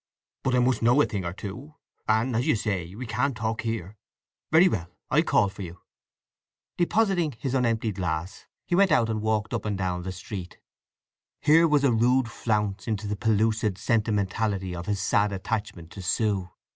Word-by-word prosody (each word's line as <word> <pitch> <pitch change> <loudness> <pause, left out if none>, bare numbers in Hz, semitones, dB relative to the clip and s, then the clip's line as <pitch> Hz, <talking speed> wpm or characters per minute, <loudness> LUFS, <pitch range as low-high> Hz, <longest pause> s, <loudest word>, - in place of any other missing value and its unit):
"But 130 -1 +1
I - - +4
must 125 +1 +2
know 120 +4 +4
a - - +6
thing 100 -3 -3
or 85 - -2
two; 125 +11 -8 0.3
and, 110 +3 +2
as 120 +3 0
you - - +4
say, 95 -4 -3
we 125 +4 -6
can't 125 +3 -1
talk 110 0 -2
here. 110 -3 -4 0.5
Very 165 +4 +7
well; 90 - -1 0.2
I'll - - +5
call - - +3
for 100 +1 -9
you." 85 -2 -8 1.0
Depositing 175 -4 +1
his 125 +3 -4
unemptied 115 -4 +1
glass 85 0 -3 0.2
he - - -4
went 190 0 +4
out 115 -7 +3
and 110 -1 -2
walked 110 0 -1
up 115 - -2
and 105 -2 -2
down 90 -2 -2
the 95 +1 -4
street. 95 0 -7 0.8
Here 160 +3 +5
was 150 -2 +3
a 135 -4 +4
rude 120 +1 +2
flounce 105 -4 -1
into 105 -2 -2
the 105 0 -2
pellucid 110 -1 +1
sentimentality 105 -3 0
of 85 0 -7
his 100 -2 0
sad 100 +1 +2
attachment 100 -4 -4
to 100 - -8
Sue. 95 0 0
110 Hz, 185 wpm, -26 LUFS, 100-125 Hz, 1.0 s, Very